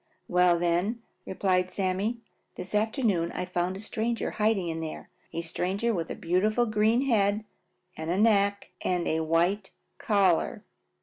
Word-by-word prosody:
"Well, 180 -1 +4
then," 175 +7 0 0.2
replied 185 -1 +1
Sammy, 195 +5 -1 0.3
"this 185 - -6
afternoon 210 - +1
I - - -3
found 180 +1 -2
a - - -9
stranger 225 +2 -2
hiding 210 -4 +1
in 165 -1 -3
there, 160 -1 -7 0.2
a 170 - -3
stranger 190 +7 -1
with 165 -4 -3
a - - -4
beautiful 210 +7 +1
green 220 +3 +2
head 210 -4 +2 0.5
and 170 +6 0
neck 200 -2 +2
and 180 -2 0
a 160 - +1
white 170 +5 +1 0.3
collar." 195 -5 +2
195 Hz, 140 wpm, -28 LUFS, 175-215 Hz, 0.5 s, Well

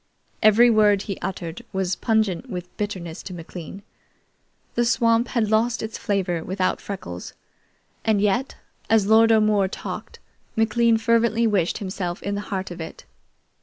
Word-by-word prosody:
Every 230 +3 +6
word 210 -2 +4
he 195 -3 -5
uttered 175 0 -5
was 190 -2 -1
pungent 220 0 0
with 180 -3 -7
bitterness 185 -6 -4
to 185 - -8
McLean. 175 +3 -9 0.9
The 240 - +2
swamp 230 0 +3
had 220 -4 0
lost 225 +2 +2
its 220 0 -5
flavor 185 -5 -1
without 185 +1 -1
Freckles; 90 - -7 0.7
and 220 -2 +2
yet, 210 +6 0 0.3
as 220 -3 +4
Lord 225 +2 +5
O'More 215 -3 +4
talked, - - -7 0.4
McLean 230 +1 +3
fervently 230 0 +2
wished 200 -6 +1
himself 185 -3 -4
in 200 - -2
the 200 - -2
heart 190 -2 -3
of 175 -1 -7
it. 160 - -9
205 Hz, 145 wpm, -23 LUFS, 185-225 Hz, 0.9 s, Every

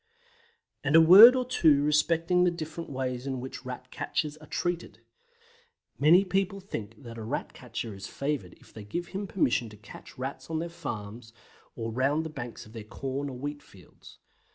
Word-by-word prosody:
And 145 +1 0
now - - +10
a - - +6
word 205 +9 +10
or 255 -1 0
two 155 - +4
respecting 165 +4 +2
the 180 - +4
different 165 -1 -6
ways 130 -1 -3
in 130 -2 -2
which 130 +1 -7
Rat 125 0 -7
catchers 150 -2 -2
are 155 -1 -15
treated. 175 +2 -3 1.0
Many 170 +7 +6
people 195 +1 -1
think 115 - -7
that 115 -1 -9
a - - -6
Rat 120 +7 -4
catcher 120 -3 -6
is 95 0 -8
favoured 140 -11 -3
if - - -21
they 110 - -9
give 170 +12 -5
him 200 +1 -4
permission 125 - +1
to 105 - -14
catch 105 - -13
Rats 135 +4 -6
on 160 - -2
their 170 +2 -3
farms 115 -8 -7 0.4
or 115 -1 -4
round 140 +6 +1
the 160 - -5
banks 120 -6 -7
of 110 - -16
their 115 - -7
corn 135 +5 -4
or 130 - -7
wheat 145 +3 -5
fields. 95 -2 -17
140 Hz, 190 wpm, -28 LUFS, 120-170 Hz, 1.0 s, now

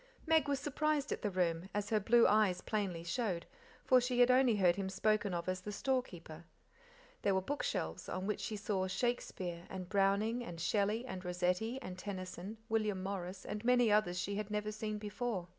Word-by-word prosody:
Meg 320 -2 +4
was 280 -1 0
surprised 300 0 0
at - - -2
the 210 - 0
room, 180 -1 0
as 205 +1 -2
her 215 - +4
blue 235 +3 +5
eyes 205 -4 +3
plainly 195 -6 -2
showed, 180 -1 -2 0.4
for 255 -1 +6
she 245 0 0
had 245 +1 +7
only 255 -3 +5
heard 180 -4 +4
him 195 0 -2
spoken 210 +1 +1
of 170 0 -3
as 185 0 -1
the 210 - -5
store 260 +5 +1
keeper. 170 -7 -11 0.8
There 195 - +2
were 190 - +2
bookshelves, 185 - -3
on 185 - -3
which 210 -1 -1
she 215 - -3
saw 195 -2 -1
Shakespeare 185 -5 -2
and 185 -2 -6
Browning 205 +4 +2
and 175 -7 -7
Shelley 210 +6 +1
and 190 -7 -6
Rossetti 180 +7 0
and 185 0 -7
Tennyson, 185 +1 -6
William 215 -4 0
Morris, 190 -1 -5
and 210 +1 -4
many 245 -2 +4
others 205 -4 +3
she 200 +3 -2
had 210 0 -3
never 210 0 -2
seen 215 0 -3
before. 210 -3 -3
205 Hz, 190 wpm, -35 LUFS, 185-225 Hz, 0.8 s, had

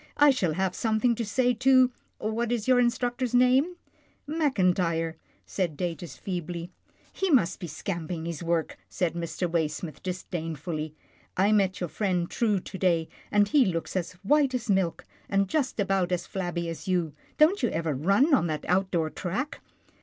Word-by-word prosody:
" - - -30
I - - +8
shall 185 - 0
have 190 +2 0
something 225 +3 +1
to 230 - -2
say 245 +4 +2
to 255 +1 +5
— - - -42
what 225 +2 -2
is, 235 -2 -1
your 255 -1 +5
instructor's 245 0 0
name? 260 +8 +4 0.2
" - - -35
" - - -42
Mackintyre," 180 - +1 0.3
said 175 -6 -2
Datus 170 -3 -4
feebly. 175 -1 -5 0.2
" - - -32
He 385 - -1
must 225 - +3
be 175 - -5
scamping 165 +1 -4
his 170 -3 -4
work," 170 -1 -1
said 175 -3 -1
Mr. 170 +1 -2
Waysmith, 160 -1 -2
disdainfully. 165 -4 -4 0.2
" - - -34
I - - +3
met 195 -3 +2
your 175 - -3
friend 180 -4 0
True 215 -4 +1
to 190 - -8
day, 170 -3 +2 0.2
and 205 0 +4
he 285 +1 +5
looks 170 -5 -2
as 185 -1 -2
white 280 +3 +3
as 235 -4 -1
milk, 180 -3 0 0.2
and 195 0 +2
just 270 +1 -1
about 195 -2 +1
as 180 0 -1
flabby 175 -3 -3
as 165 +4 -6
you. 175 -5 0 0.2
Don't 320 +5 +5
you 240 - +2
ever 160 -1 -1
run 195 - +3
on 255 - +4
that 155 -2 -3
out 185 +2 +2
door 160 -4 0
track 250 - -4
185 Hz, 185 wpm, -27 LUFS, 170-240 Hz, 0.3 s, I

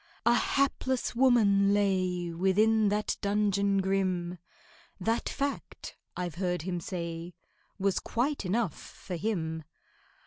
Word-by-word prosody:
A 235 - +6
hapless 260 -1 0
woman 205 -6 +4
lay 185 -4 0
Within 210 +5 +3
that 210 +1 0
dungeon 200 -1 +2
grim— 185 -2 0 0.6
That 225 +5 0
fact, 280 0 -4 0.2
I've 180 -2 -3
heard 180 -3 0
him 175 -1 -2
say, 170 -1 -5 0.4
Was 195 -1 +1
quite 275 +3 -1
enough 200 -2 0
for 185 - -8
him. 160 -4 -2
195 Hz, 110 wpm, -29 LUFS, 180-220 Hz, 0.6 s, A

